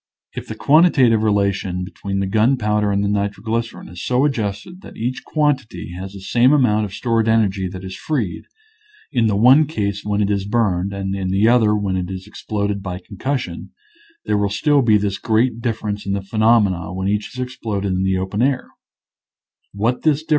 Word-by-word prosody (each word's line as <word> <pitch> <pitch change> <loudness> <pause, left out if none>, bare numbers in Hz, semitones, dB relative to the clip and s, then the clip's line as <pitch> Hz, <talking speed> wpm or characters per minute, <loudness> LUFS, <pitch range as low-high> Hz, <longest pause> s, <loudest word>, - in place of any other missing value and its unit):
If - - -7
the - - -6
quantita 150 -5 +4
tive 110 -1 +2
relation 100 -3 0
between 100 +1 -4
the - - 0
gunpowder 105 0 +1
and 100 0 +1
the - - 0
nitroglycerin 105 +3 -2
is 90 0 -9
so 125 +3 +2
adjusted 120 - -3
that - - -12
each 125 +3 -3
quantity 130 - -1
has 95 +2 -7
the 100 - -10
same 120 +7 +3
amount 110 -7 +3
of 100 - -8
stored 115 -2 0
energy 105 -4 +2
that 90 +1 -8
is 95 0 -7
freed, 120 - -3 0.7
in 120 -5 +2
the 105 - +1
one 130 +8 +6
case 100 - -3
when 105 0 -1
it 100 - 0
is 100 -1 -1
burned 100 -4 0
and 95 -1 -3
in 95 -1 -3
the 100 +4 +3
other 115 -3 +4
when 100 -3 -1
it 90 -1 -3
is 95 0 -6
exploded 105 -1 -3
by 90 -2 -5
concussion, 105 -1 -5 0.5
there 105 -1 +1
will 100 0 +1
still 145 +8 +2
be 110 -4 +4
this 100 -2 -2
great 115 +3 +1
difference 105 -4 -3
in 100 - 0
the 100 -1 -2
phenomena 105 -4 +2
when 95 +1 -3
each 105 +4 -2
is - - -7
exploded 110 -6 -3
in 90 - -1
the 95 0 +1
open 95 +3 -2
air. 130 0 0
105 Hz, 185 wpm, -20 LUFS, 95-120 Hz, 0.7 s, one